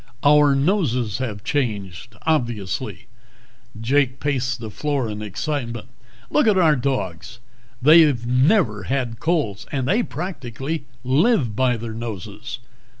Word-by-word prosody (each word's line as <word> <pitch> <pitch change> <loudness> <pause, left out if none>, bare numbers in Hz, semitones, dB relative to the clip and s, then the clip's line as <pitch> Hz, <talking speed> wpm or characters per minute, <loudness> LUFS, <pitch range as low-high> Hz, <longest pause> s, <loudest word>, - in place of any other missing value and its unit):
"Our 145 -1 +5
noses 135 - +1
have 110 -6 -4
changed, 110 -5 -3
obviously." 120 - -2 0.7
Jake 130 +2 +1
paced 130 -3 -1
the 110 -2 -7
floor 140 +2 -1
in 105 0 -5
excitement. 115 +3 -4 0.4
"Look 300 - +3
at 210 -3 +4
our 160 -5 +5
dogs! 120 - -3 0.5
They've 150 -5 +6
never 125 - +2
had 125 -2 -2
colds 150 - -1
and 130 -2 -1
they 205 - +3
practically 150 - -5 0.2
live 135 - +2
by 125 0 +2
their 115 0 -6
noses. 110 0 -6
130 Hz, 120 wpm, -22 LUFS, 115-150 Hz, 0.7 s, They've